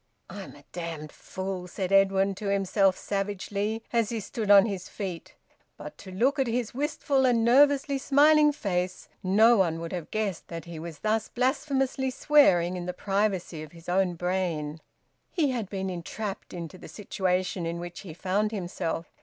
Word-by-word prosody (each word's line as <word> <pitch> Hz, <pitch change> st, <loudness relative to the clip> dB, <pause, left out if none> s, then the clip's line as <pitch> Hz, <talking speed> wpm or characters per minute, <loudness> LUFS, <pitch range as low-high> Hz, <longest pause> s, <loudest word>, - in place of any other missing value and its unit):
'" -, -, -46 dB
"I'm -, -, -8 dB
a -, -, -16 dB
damned 165 Hz, -3 st, -6 dB
fool!" 190 Hz, -1 st, -6 dB
said 185 Hz, +1 st, -4 dB
Edwin 195 Hz, 0 st, +4 dB
to 200 Hz, +2 st, -6 dB
himself 195 Hz, -1 st, +2 dB
savagely, 205 Hz, +2 st, -2 dB
as 230 Hz, -2 st, +2 dB
he 230 Hz, -, -2 dB
stood 215 Hz, 0 st, -4 dB
on 200 Hz, -1 st, +8 dB
his 195 Hz, -4 st, -4 dB
feet. 185 Hz, -5 st, -6 dB, 0.4 s
But -, -, -9 dB
to 190 Hz, -, -10 dB
look 260 Hz, +10 st, +1 dB
at 265 Hz, -, +2 dB
his 235 Hz, -1 st, -1 dB
wistful 280 Hz, 0 st, 0 dB
and 240 Hz, -3 st, +3 dB
nervously 280 Hz, +2 st, +4 dB
smiling 295 Hz, +2 st, +5 dB
face, 185 Hz, -9 st, -3 dB
no 220 Hz, +5 st, +5 dB
one 165 Hz, -4 st, +1 dB
would 165 Hz, +1 st, -6 dB
have 175 Hz, -3 st, -5 dB
guessed 210 Hz, -5 st, -2 dB
that 165 Hz, 0 st, -7 dB
he 170 Hz, -2 st, -8 dB
was 165 Hz, -1 st, -7 dB
thus 215 Hz, 0 st, 0 dB
blasphemously 265 Hz, +1 st, 0 dB
swearing 190 Hz, -, +4 dB
in 175 Hz, 0 st, -5 dB
the 180 Hz, -, -2 dB
privacy 195 Hz, -4 st, -1 dB
of 155 Hz, 0 st, -10 dB
his 165 Hz, -1 st, -15 dB
own 180 Hz, 0 st, +1 dB
brain. 165 Hz, -4 st, -2 dB, 0.5 s
He 305 Hz, -7 st, +1 dB
had 230 Hz, -6 st, -3 dB
been 190 Hz, -1 st, -3 dB
entrapped 190 Hz, +3 st, -5 dB
into 175 Hz, 0 st, -7 dB
the -, -, -10 dB
situation 185 Hz, -3 st, -2 dB
in 170 Hz, +1 st, -3 dB
which 175 Hz, 0 st, -7 dB
he 170 Hz, -6 st, -9 dB
found 195 Hz, +4 st, 0 dB
himself. 175 Hz, -4 st, -3 dB
195 Hz, 175 wpm, -27 LUFS, 180-230 Hz, 0.5 s, on